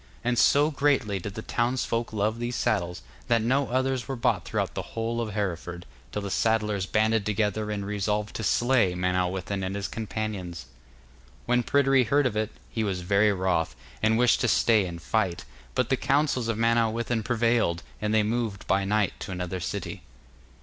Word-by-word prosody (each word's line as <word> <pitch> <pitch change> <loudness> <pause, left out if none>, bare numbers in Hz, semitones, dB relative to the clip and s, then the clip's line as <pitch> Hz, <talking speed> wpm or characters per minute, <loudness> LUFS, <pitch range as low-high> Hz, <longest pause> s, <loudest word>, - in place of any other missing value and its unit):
And 120 0 +1
so 145 +2 +5
greatly 135 -8 +1
did 100 +2 -7
the 110 - -5
townsfolk 120 -1 -1
love 110 +1 -1
these 120 +1 -2
saddles, 90 -7 -1 0.2
that 115 -2 +3
no 135 +4 +2
others 130 0 0
were 135 - -3
bought 115 - 0
throughout - - -2
the - - -3 0.2
whole 115 +1 -1
of 110 -3 -4
Hereford, 90 -3 -3 0.3
till 105 - -3
the 100 - -4
saddlers 105 -4 +1
banded 110 0 +2
together 105 +1 -1
and 100 -2 -3
resolved 105 +1 -2
to 115 - -4
slay 120 -3 +3
Manawyddan 90 +2 -1
and 95 +1 -3
his 100 0 -2
companions. 105 - -4 0.8
When 125 0 +3
Pryderi 135 0 +3
heard 140 +5 +3
of 120 -4 0
it, 110 0 0 0.2
he 110 - -1
was 95 -3 -2
very 100 +3 +3
wroth, 95 -4 0 0.3
and 110 +1 +3
wished 125 0 +4
to - - +2
stay 110 -3 +3
and 85 -1 -7
fight. 95 -1 -1 0.3
But 125 - +1
the 130 - +2
counsels 140 -3 +1
of 115 -2 -1
Manawyddan 115 0 +1
prevailed, 115 -7 +1 0.2
and 105 0 0
they 110 -1 +4
moved 110 -2 -2
by 95 +1 +2
night 105 0 +1
to - - -6
another 90 0 -3
city. - - -4
110 Hz, 175 wpm, -27 LUFS, 100-120 Hz, 0.8 s, so